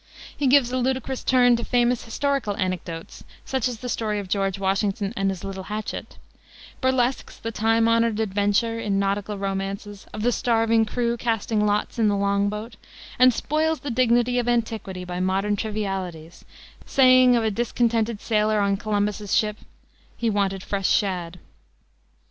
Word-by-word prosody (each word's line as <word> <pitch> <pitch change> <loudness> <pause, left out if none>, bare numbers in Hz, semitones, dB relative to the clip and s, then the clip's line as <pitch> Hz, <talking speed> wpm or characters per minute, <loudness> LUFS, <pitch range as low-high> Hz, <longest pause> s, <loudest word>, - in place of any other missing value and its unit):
He 285 - 0
gives 255 -2 +4
a 255 - 0
ludicrous 260 +1 -2
turn 245 -2 +4
to 235 - -5
famous 245 -1 +1
historical 270 -3 -1
anecdotes, 180 -4 -4 0.2
such 265 -2 0
as 245 -2 -4
the 250 - -5
story 220 -3 -1
of 200 -2 -4
George 195 0 0
Washington 195 +1 -1
and 195 -2 0
his 190 -2 -5
little 190 -1 -6
hatchet; 215 +1 -5 0.6
burlesques 260 -1 0
the 230 - -5
time 225 +1 +2
honored 230 -1 +2
adventure, 205 +2 +1
in 205 -3 -1
nautical 200 +1 -1
romances, 195 +1 -4
of 215 - -5
the 245 - +3
starving 225 -2 +2
crew 235 +1 -1
casting 225 -2 0
lots 210 +3 -1
in 220 - +4
the 205 -1 +2
long 200 0 +1
boat, 210 +1 -6 0.4
and 255 0 +7
spoils 310 +6 -1
the 285 - -4
dignity 245 0 +2
of 240 - -2
antiquity 220 -6 -2
by 180 0 -5
modern 195 +3 0
trivialities, 190 -6 -4 0.4
saying 255 -2 +5
of 235 - +1
a 220 - +1
discontented 230 0 0
sailor 215 -1 +1
on 200 -1 +1
Columbus's 205 0 -1
ship, 210 -1 +1 0.6
"He 230 -1 0
wanted 195 -2 -1
fresh 195 -2 -1
shad." 180 -4 0
215 Hz, 160 wpm, -24 LUFS, 200-240 Hz, 0.6 s, and